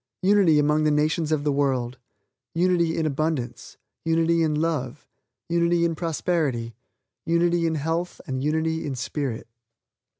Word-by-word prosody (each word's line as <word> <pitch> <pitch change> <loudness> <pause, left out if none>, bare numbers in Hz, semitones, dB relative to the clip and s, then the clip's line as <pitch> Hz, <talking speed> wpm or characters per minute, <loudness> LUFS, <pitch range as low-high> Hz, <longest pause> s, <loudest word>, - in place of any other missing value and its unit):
Unity 190 -5 +5
among 150 +1 +3
the 155 - +3
nations 150 +1 +1
of 155 -2 +1
the 145 - +1
world, 130 -3 0 0.6
unity 170 -1 +2
in 160 - 0
abundance, 155 -3 -3 0.3
unity 165 0 +2
in 155 -2 +1
love, 150 -4 -2 0.4
unity 170 0 +2
in 165 - +1
prosperity, 155 -7 -1 0.5
unity 170 0 +2
in 160 - -1
health 165 +4 -2
and 130 -4 -3
unity 160 +2 0
in 140 -3 -3
spirit. 130 -2 -4
160 Hz, 135 wpm, -24 LUFS, 145-170 Hz, 0.6 s, Unity